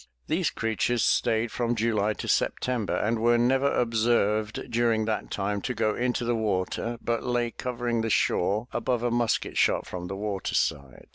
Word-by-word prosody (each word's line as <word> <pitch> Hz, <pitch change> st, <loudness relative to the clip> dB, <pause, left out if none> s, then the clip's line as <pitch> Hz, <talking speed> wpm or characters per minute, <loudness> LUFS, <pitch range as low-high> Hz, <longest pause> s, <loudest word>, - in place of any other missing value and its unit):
These 165 Hz, +1 st, +1 dB
creatures 115 Hz, +1 st, 0 dB
stayed 115 Hz, +1 st, +1 dB
from 120 Hz, -1 st, -1 dB
July 110 Hz, -2 st, +1 dB
to -, -, -7 dB
September 125 Hz, -5 st, 0 dB
and 110 Hz, +2 st, 0 dB
were 120 Hz, +1 st, +4 dB
never 135 Hz, +4 st, +2 dB
observed 110 Hz, -2 st, +1 dB
during 115 Hz, -2 st, +2 dB
that 110 Hz, -1 st, -2 dB
time 100 Hz, 0 st, -2 dB
to 125 Hz, -, -3 dB
go 110 Hz, -1 st, +1 dB
into 125 Hz, +1 st, -1 dB
the 120 Hz, -, +1 dB
water 110 Hz, +2 st, -1 dB
but 115 Hz, 0 st, 0 dB
lay 120 Hz, -1 st, -1 dB
covering 120 Hz, -2 st, -2 dB
the 115 Hz, -, -1 dB
shore 105 Hz, +2 st, +1 dB
above 120 Hz, 0 st, -1 dB
a 120 Hz, -, +1 dB
musket 120 Hz, -1 st, 0 dB
shot -, -, +2 dB
from 90 Hz, -1 st, -6 dB
the 95 Hz, -, -5 dB
water 100 Hz, -2 st, -3 dB
side. 70 Hz, -3 st, -2 dB
115 Hz, 170 wpm, -27 LUFS, 105-120 Hz, -, were